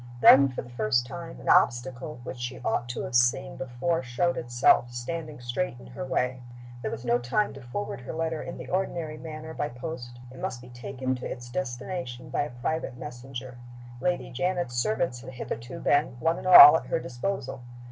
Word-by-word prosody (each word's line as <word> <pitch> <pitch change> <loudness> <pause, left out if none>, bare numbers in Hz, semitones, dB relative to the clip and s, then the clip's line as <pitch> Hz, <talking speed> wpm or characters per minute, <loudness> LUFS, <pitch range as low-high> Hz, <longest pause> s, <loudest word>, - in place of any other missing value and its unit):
Then, 135 +3 +8
for 130 - -5
the 120 - -13
first 120 0 +1
time, 60 - -8
an - - -11
obstacle 125 +3 +2
which 130 0 -7
she 120 +1 -4
ought 120 - 0
to 125 - -3
have 135 - -6
seen 125 +3 +3
before 130 +6 -1
showed 130 +8 0
itself, 120 0 +3
standing 155 +5 -5
straight 120 +2 -3
in - - -13
her 125 +2 -7
way. 130 -1 -1 0.4
There - - -2
was 120 +2 -6
no 120 0 +3
time 130 +13 0
to 135 - -10
forward 120 -2 -5
her 125 - -6
letter 160 -1 -2
in 170 - -7
the - - -8
ordinary 170 -4 -2
manner 160 0 -7
by 145 - -2
post. 120 -2 -7
It 130 - -12
must 120 - -3
be 125 0 -13
taken 130 +2 -4
to 125 - -6
its 120 0 -7
destination 130 +1 -4
by - - +1
a 145 - -2
private 155 -6 -2
messenger. 125 -1 -8 0.4
Lady 180 +5 -1
Janet's 175 0 -1
servants 125 - 0
had 130 0 -9
hitherto 120 0 -6
been, 145 -4 +2
one 165 +5 +1
and - - -6
all, 150 -4 +12
at - - -8
her - - +1
disposal. 130 0 -4
130 Hz, 195 wpm, -27 LUFS, 120-155 Hz, 0.4 s, all